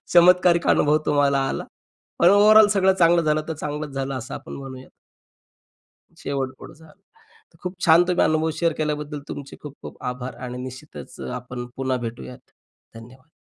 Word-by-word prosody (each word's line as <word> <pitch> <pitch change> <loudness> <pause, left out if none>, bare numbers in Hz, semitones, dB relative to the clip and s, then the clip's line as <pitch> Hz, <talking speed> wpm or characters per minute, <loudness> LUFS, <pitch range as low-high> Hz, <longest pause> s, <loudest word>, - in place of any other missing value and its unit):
चमत्कारिक 175 0 +5
अनुभव 150 +1 +3
तुम्हाला 145 -1 +2
आला. - - -4 0.5
पण 170 - +6
ओव्हरऑल 210 +2 +7
सगळं 190 -1 +3
चांगलं 170 0 +4
झालं, 155 0 +1
तर - - -1
चांगलंच 150 0 -5
झालं 135 0 -3
असं 125 +1 -7
आपण 145 +4 -9
म्हणूयात. 130 -1 -10 1.3
शेवट 135 -2 -3
गोड 160 - -12
झाल. 160 -1 -18 0.6
तर - - -24
खूप 180 +1 -5
छान 165 +1 +7
तुम्ही 180 0 +2
अनुभव 155 +1 +1
शेअर 170 -1 +2
केल्याबद्दल 150 -1 -3
तुमचे 140 -1 -8
खूप-खूप 145 -1 -11
आभार 125 +1 -7
आणि 125 0 -6
निश्चितच 130 0 -10
अ, - - -6
आपण 125 0 -7
पुन्हा 130 -1 -1
भेटूयात. 125 +2 -10 0.4
धन्यवाद. 125 +5 -14
150 Hz, 155 wpm, -23 LUFS, 130-165 Hz, 1.3 s, ओव्हरऑल